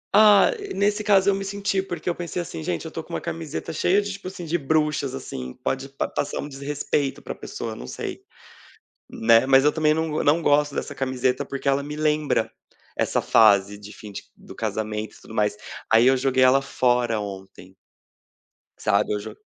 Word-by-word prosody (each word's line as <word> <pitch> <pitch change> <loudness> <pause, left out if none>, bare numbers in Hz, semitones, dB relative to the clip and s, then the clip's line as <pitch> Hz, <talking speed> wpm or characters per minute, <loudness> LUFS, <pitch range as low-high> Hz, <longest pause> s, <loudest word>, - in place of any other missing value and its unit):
Ah, 210 - +7 0.2
nesse 205 +2 +1
caso, 200 -2 +4
eu - - +1
me 195 0 -3
senti, 195 0 -1
porque 175 -4 -7
eu 175 - +2
pensei 175 +1 -5
assim 165 - -5
gente, 85 +1 -3
eu - - -5
estou - - -6
com - - -12
uma - - -1
camiseta 165 0 -5
cheia 185 +5 +2
de 205 0 -3
tipo 200 -1 -9
assim, 185 -2 -7
de 170 +2 -1
bruxas, 150 -2 0
assim 65 - -7
pode 135 +1 -2
pa 135 - -3
passar 145 - -3
um - - -4
desrespeito 140 0 -2
para - - -6
a - - -17
pessoa, - - -6
não - - -9
sei, - - -6 0.9
né. 115 +1 +4
Mas 135 0 +5
eu 150 - +4
também 155 -1 +2
não 160 -1 -1
não 150 +4 +3
gosto 145 -1 +3
dessa 145 - -4
camiseta, 130 -1 -1
porque 140 0 -4
ela 135 +1 +2
me 150 +1 -6
lembra 150 -1 +1 0.5
essa - - +1
fase 100 -2 +4
de 105 0 -11
fim 105 -1 -11
de - - -7
do - - -13
casamento 110 -1 -4
e - - -18
tudo 110 - -12
mais, 105 -1 +1 0.4
aí 115 +2 +6
eu 130 +1 +5
joguei 130 0 +2
ela 130 +2 +5
fora 120 -4 +1
ontem. 95 -2 -9 1.0
Sabe, 100 +1 +1
eu 105 - -1
jo 110 +1 -8
140 Hz, 200 wpm, -24 LUFS, 110-160 Hz, 1.0 s, Ah